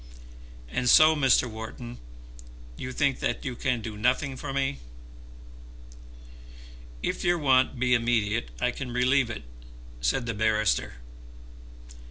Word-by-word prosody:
And 125 - -1
so, 155 +4 +7
Mr. 135 -3 +3
Wharton, 110 - -8 0.8
you 125 - -6
think 140 +1 0
that - - -2
you 130 -2 -3
can 125 -1 -1
do 110 -1 -6
nothing 125 +5 0
for 130 - -6
me." 135 - -1 2.2
"If - - -2
your 175 0 +2
want 130 -3 +2
be 125 0 +2
immediate 115 - +1
I - - +1
can 130 -3 -6
relieve 125 +1 +2
it," 115 - -6 0.6
said - - 0
the 115 - -2
barrister. 110 - +1
125 Hz, 125 wpm, -27 LUFS, 110-135 Hz, 2.2 s, so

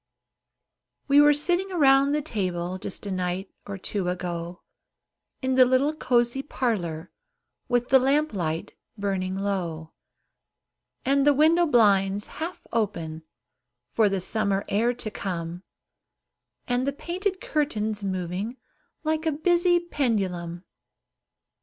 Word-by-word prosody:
We 285 +1 +6
were 295 0 +7
sitting 355 +6 +1
around 275 -4 +4
the 300 0 0
table, 185 - -3
Just 195 +1 -6
a 200 - -3
night 185 +1 -3 0.2
or 200 -1 -5
two 190 -1 -2
ago, 175 -1 -5 0.8
In 260 0 +1
the 255 0 +7
little 260 +4 +2
cozy 240 -2 +1
parlor, 180 - -2 0.6
With 245 0 0
the 265 - +7
lamp 285 +2 +2
light 170 0 -3 0.2
burning 190 -2 -2
low, 175 -5 -3 1.1
And 275 +1 +3
the 290 0 +5
window 330 +4 +4
blinds 205 -5 +3
half 340 +3 -5
opened, 170 -8 -2 0.7
For 220 -2 +4
the 195 -1 -1
summer 200 0 0
air 225 +4 +2
to 220 -3 -5
come, 175 -3 -4 1.1
And 245 +2 0
the 280 - 0
painted 370 +6 -3
curtains 220 -9 -1
moving 190 +5 -3 0.5
Like 315 +1 -1
a - - +3
busy 345 +3 +3
pendulum. 190 - -2
220 Hz, 120 wpm, -26 LUFS, 185-280 Hz, 1.1 s, were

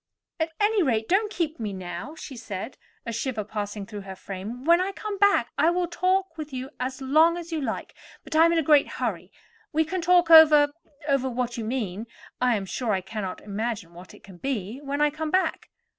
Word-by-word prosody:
"At 320 0 0
any 420 0 +3
rate, 225 -8 +1
don't 415 +4 +2
keep 325 - -2
me 210 -3 -3
now," 185 - -6
she 290 -4 -9
said, 220 0 -6 0.3
a 235 - -4
shiver 235 -1 -2
passing 205 -1 -5
through 210 -1 -8
her 190 -1 -8
frame. 200 +7 -7
"When 340 +2 +5
I 390 +1 -2
come 410 0 -5
back 405 0 +4
I 325 - +5
will 355 +1 +1
talk 370 -1 0
with 305 -1 -6
you 260 +1 -5
as 260 +1 -4
long 315 +5 +4
as 340 -1 -8
you 320 -2 -2
like; 270 - -4 0.3
but - - -6
I 320 +1 +7
am 335 - +4
in 335 - +2
a 325 - +2
great 295 -1 +5
hurry. - - -3 0.4
We 315 +1 +2
can 370 +3 -3
talk 350 0 +4
over—over 290 -3 +5
what 245 -1 -2
you 230 - -4
mean 220 -3 -3 0.3
(I 250 -2 +3
am 200 -2 -3
sure 225 +3 -2
I 190 - 0
cannot 190 -1 -5
imagine 205 -4 -4
what 175 +2 -12
it - - -19
can 190 -2 -13
be) 230 0 -3
when 285 +1 -3
I 295 0 +4
come 310 +1 -4
back." 370 +3 0
270 Hz, 215 wpm, -26 LUFS, 215-325 Hz, 0.4 s, I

